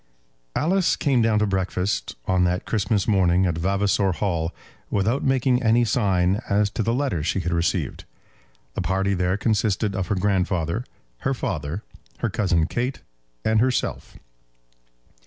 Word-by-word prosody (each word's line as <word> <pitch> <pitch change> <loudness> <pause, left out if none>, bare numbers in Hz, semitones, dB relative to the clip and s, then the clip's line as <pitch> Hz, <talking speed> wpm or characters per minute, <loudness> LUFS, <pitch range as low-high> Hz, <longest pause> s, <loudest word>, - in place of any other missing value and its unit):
Alice 185 +3 +2
came 135 -5 +2
down 110 -1 +3
to 105 - +3
breakfast 95 0 -1
on 95 -1 +2
that 90 +1 0
Christmas 105 -2 0
morning 95 -3 +3
at 85 -3 -1
Vavasor 100 +1 +1
Hall 85 -4 -1 0.4
without 110 +7 +1
making 130 -1 +2
any 120 0 +3
sign 100 -3 +1
as 100 0 +2
to 115 - -2
the 115 - +1
letter 125 - 0
she 85 +5 0
had 85 0 -2
received. 85 0 -1 0.7
The - - -2
party 95 +2 0
there 90 +1 0
consisted 105 -1 0
of 95 -2 -2
her 105 - 0
grandfather, 95 +1 0 0.3
her 135 - -1
father, 80 - -3 0.3
her - - -2
cousin 85 -6 +1
Kate, 125 +8 -3 0.4
and 110 0 +3
herself. 125 +2 -1
100 Hz, 145 wpm, -24 LUFS, 90-115 Hz, 0.7 s, down